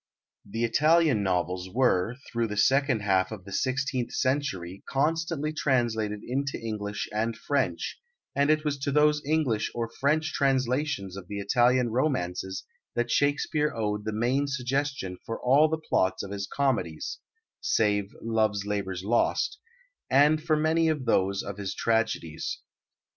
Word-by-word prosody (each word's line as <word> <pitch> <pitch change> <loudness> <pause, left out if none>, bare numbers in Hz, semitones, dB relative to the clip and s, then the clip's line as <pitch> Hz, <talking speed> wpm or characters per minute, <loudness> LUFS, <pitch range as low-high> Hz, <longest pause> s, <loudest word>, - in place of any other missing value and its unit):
The 115 +3 -4
Italian 150 +1 +4
novels 90 -1 -1
were 115 -3 +2 0.2
through 115 -1 0
the 105 -1 -5
second 135 0 +3
half 95 -1 +2
of 100 -4 -8
the 100 - -10
sixteenth 130 +1 -1
century 100 -10 -1
constantly 155 +1 0
translated 115 -8 0
into 135 +2 -2
English 105 -2 -4
and 110 +1 -1
French, 140 +3 -1 0.4
and 140 +1 +2
it 155 0 +2
was 145 -2 -1
to 140 +1 -1
those 150 +1 +3
English 145 -7 +1
or 115 -1 -1
French 155 +3 +1
translations 130 -7 0
of 100 -3 -8
the 100 - -5
Italian 120 +4 +3
romances 95 - -1 0.3
that 120 0 0
Shakespeare 145 +1 +1
owed 105 -2 -1
the 110 - -1
main 125 +6 +1
suggestion 135 -7 -2
for 115 - -5
all 140 +5 +5
the 160 - 0
plots 95 -11 0
of 100 - -7
his 100 0 -4
comedies 110 - -1 0.4
(save 105 - +1
Love's 110 -3 +1
Labour's 95 -3 -3
Lost) 120 - +1 0.5
and 150 +3 +5
for 155 -1 +2
many 160 +2 +2
of 150 -5 0
those 100 -3 +1
of 100 0 -6
his 95 -2 -3
tragedies. 110 -9 -1
120 Hz, 145 wpm, -27 LUFS, 100-145 Hz, 0.5 s, all